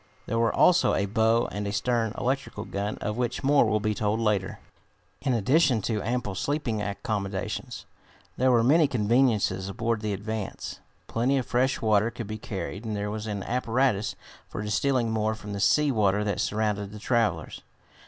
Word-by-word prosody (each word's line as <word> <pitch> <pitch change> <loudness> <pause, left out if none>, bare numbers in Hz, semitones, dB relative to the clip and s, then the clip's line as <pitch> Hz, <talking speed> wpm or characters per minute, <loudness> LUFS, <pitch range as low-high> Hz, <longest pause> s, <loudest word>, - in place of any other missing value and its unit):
There 115 - -1
were 115 -1 +3
also 180 0 +4
a 100 - +1
bow 115 +2 +2
and 105 0 -3
a - - -2
stern 115 +2 0
electrical 130 -5 -2
gun, 100 +1 -3
of 105 +1 -2
which 125 0 -2
more 140 -1 +5
will 110 0 +1
be 105 0 0
told 105 +1 0
later. 105 -4 0 0.6
In 135 - 0
addition 130 +3 +3
to 110 -3 -1
ample 115 -3 -2
sleeping 120 0 -1
accommodations, 100 -1 -4 0.5
there 130 +1 +2
were 120 -2 +4
many 150 +5 +5
conveniences 115 -5 +1
aboard 115 +1 -1
the 105 -1 -2
Advance. 105 +1 -5 0.3
Plenty 125 +4 +1
of 130 - -1
fresh 130 +1 0
water 110 0 +3
could 120 0 -7
be 110 +1 -6
carried, 100 0 -5
and 110 -2 -3
there 105 0 -2
was 110 0 -5
an 100 -2 -3
apparatus 120 -3 0 0.3
for 105 - -5
distilling 115 +3 +1
more 110 0 0
from 105 -1 -8
the 100 - -4
sea 150 +8 +3
water 105 -3 +2
that 100 -3 -1
surrounded 105 -2 -1
the 105 - -8
travelers. 105 - -1
110 Hz, 175 wpm, -27 LUFS, 105-120 Hz, 0.6 s, more